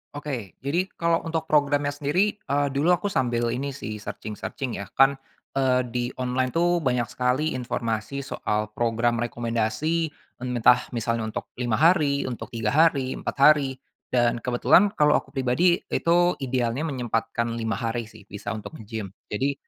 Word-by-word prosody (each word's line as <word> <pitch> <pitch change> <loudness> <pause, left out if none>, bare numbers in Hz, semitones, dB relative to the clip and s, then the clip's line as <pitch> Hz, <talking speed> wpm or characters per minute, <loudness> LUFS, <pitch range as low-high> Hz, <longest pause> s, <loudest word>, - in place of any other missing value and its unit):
Oke. 125 - -5
Jadi, 175 +7 0
kalau 170 0 +2
untuk 165 -1 -3
programnya 145 -1 +2
sendiri, 155 +9 +1
eee, 145 -6 0
dulu 145 +5 +2
aku 180 +2 +2
sambil 120 -2 +1
ini 140 +3 -2
sih, 110 -6 -6
searching-searching 110 +3 -5
ya. 100 - -8
Kan, 135 +1 +6 0.4
eee, 130 -2 +2
di 120 0 -2
online 130 0 0
tuh, 175 +3 +2
banyak 125 -3 +1
sekali 130 +5 0
informasi 120 +1 -3
soal 105 -2 -2
program 115 0 +1
rekomendasi, 120 +8 -1 0.3
entah, 125 -1 +3
misalnya 115 -1 -1
untuk - - -5 0.2
5 115 -3 +1
hari, 150 -3 +3
untuk 125 -2 -5
3 115 -1 -2
hari, 140 -4 +3
4 - - -4
hari. 140 -2 +5 0.3
Dan, 120 -1 +2
kebetulan 130 - +4
kalau 150 0 +5
aku 140 - 0
pribadi 135 +7 +2 0.2
itu, 175 +1 +3
idealnya 125 0 -1
menyempatkan 115 -2 -2
5 115 -1 -2
hari 115 -1 -3
sih, 100 - -16
bisa, 105 0 -7
untuk 110 +6 -6
nge-gym. 105 -3 -6 0.2
Jadi, 135 +7 0
130 Hz, 150 wpm, -25 LUFS, 115-145 Hz, 0.4 s, Kan